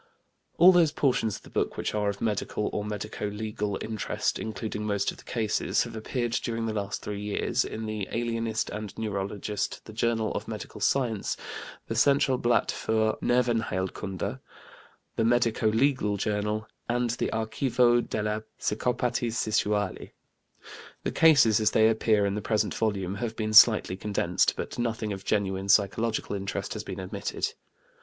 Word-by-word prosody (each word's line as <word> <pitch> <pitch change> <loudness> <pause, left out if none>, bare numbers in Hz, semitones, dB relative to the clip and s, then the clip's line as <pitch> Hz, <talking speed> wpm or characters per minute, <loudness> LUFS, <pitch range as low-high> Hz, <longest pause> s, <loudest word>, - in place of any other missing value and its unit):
All 180 +2 +9
those 170 -4 +4
portions 125 -8 +1
of - - -11
the - - -15
book - - -1
which - - -2
are 105 -1 +1
of 100 0 -5
medical 105 -1 -1
or 105 - -1
medico 105 0 -4
legal 105 -1 -3
interest, 110 -2 -2
including 110 0 -4
most 100 -2 0
of - - -13
the - - -14
cases, 110 -3 0
have - - -8
appeared 120 +2 -2
during 115 -1 -2
the 110 - -2
last 100 -2 -3
three 105 -1 -4
years 105 0 0
in 110 0 -5
the 110 -2 -3
Alienist 115 -1 -1
and 105 -1 -6
Neurologist, 105 -1 -3
the 110 - -10
Journal 115 -1 0
of - - -4
Mental - - -7
Science, 120 -7 0 0.5
the - - -2
Centralblatt 125 -1 +3
für 110 -1 0
Nervenheilkunde, 110 -6 -1 0.8
the 115 - +2
Medico 115 -1 +2
legal 110 -2 +2
Journal, 105 +1 -1 0.2
and 120 0 +1
the 120 - -1
Archivo 120 +2 +2
delle 105 -1 -2 0.2
Psicopatie 120 +2 0
Sessuale. 105 -3 -1 0.9
The - - -1
cases, 140 -10 +5
as 110 - +3
they 110 0 +4
appear 110 -2 +2
in 100 - 0
the 105 - -2
present 105 -1 0
volume, 100 -4 -1
have 115 +1 -3
been 110 -1 -2
slightly 110 -4 +7
condensed, 95 -3 +1
but - - -5
nothing 115 -3 -1
of 95 0 -7
genuine 95 -2 -1
psychological 105 +2 +2
interest 100 0 -3
has - - -5
been - - -6
omitted. - - -3
110 Hz, 155 wpm, -27 LUFS, 105-115 Hz, 0.9 s, All